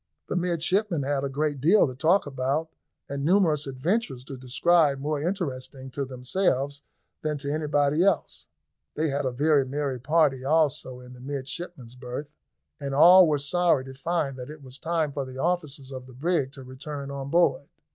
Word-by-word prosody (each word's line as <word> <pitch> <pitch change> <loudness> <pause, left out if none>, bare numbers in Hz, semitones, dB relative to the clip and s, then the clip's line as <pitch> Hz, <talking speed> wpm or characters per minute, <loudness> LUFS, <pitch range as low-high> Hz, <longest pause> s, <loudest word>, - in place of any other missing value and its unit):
The - - -1
midshipmen 180 0 0
had 140 0 -1
a 140 - -1
great 145 0 -1
deal 185 +9 +5
to 130 - -4
talk 165 +9 +3
about, 140 +3 -1 0.4
and 140 0 -4
numerous 160 -4 +3
adventures 135 - -1
to 135 +1 -8
describe 140 +4 +2
more 145 +1 -2
interesting 135 -7 -4
to 140 +1 -3
themselves 135 +2 -1 0.4
than 155 -1 -1
to 140 +1 -3
anybody 150 +1 +2
else. 195 -2 0 0.5
They 155 +1 0
had 140 0 -1
a 130 - 0
very 145 +2 +3
merry 135 -1 -3
party 140 -1 +2
also 145 -3 +1
in 125 0 -12
the 125 - -13
midshipmen's 135 -1 -6
berth, 125 +3 -7 0.5
and 140 -1 -3
all 180 +4 +8
were 150 -1 +2
sorry 145 -1 +2
to 135 - -9
find 145 -1 -2
that 125 - -7
it 150 -1 -10
was 130 +1 -10
time 160 -2 0
for 140 0 -3
the 130 0 -9
officers 150 -3 -2
of 130 -1 -8
the 130 - -13
brig 145 -1 0
to 135 - -9
return 140 +2 -7
on 140 0 -5
board. 170 -3 +2
145 Hz, 175 wpm, -26 LUFS, 135-160 Hz, 0.5 s, all